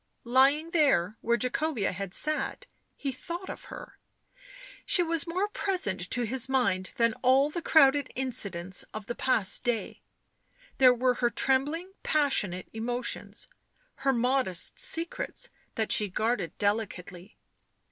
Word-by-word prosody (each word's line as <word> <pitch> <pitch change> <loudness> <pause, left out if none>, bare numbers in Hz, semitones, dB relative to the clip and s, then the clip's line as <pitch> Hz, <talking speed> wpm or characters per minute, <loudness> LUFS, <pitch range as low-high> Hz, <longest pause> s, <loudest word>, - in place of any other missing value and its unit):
Lying 275 +6 +3
there, 245 - +2
where 235 +1 +1
Jacobea 250 -2 -1
had 190 0 -5
sat, 310 +10 -2 0.3
he 275 - -3
thought 345 +8 -6
of - - -10
her; - - -11 0.8
she 355 - +4
was 330 -1 +1
more 365 +5 -1
present 355 - -1
to 245 - 0
his 260 +3 -2
mind 195 -9 +1
than 230 -1 +2
all 270 +3 +4
the 345 - -4
crowded 285 -4 +4
incidents 200 -9 -2
of 215 -1 -6
the 240 - -4
past 220 -6 +1
day; 240 -3 -2 0.8
there 255 -1 +8
were 250 +1 +2
her 240 0 0
trembling 290 - 0
passionate 210 - 0
emotions, 240 +3 -3 0.5
her 275 0 +1
modest 245 -7 0
secrets, 335 +8 -1 0.2
that 220 -1 -1
she 210 - +5
guarded 200 -3 -2
delicately. 200 -3 -3
250 Hz, 130 wpm, -28 LUFS, 210-290 Hz, 0.8 s, there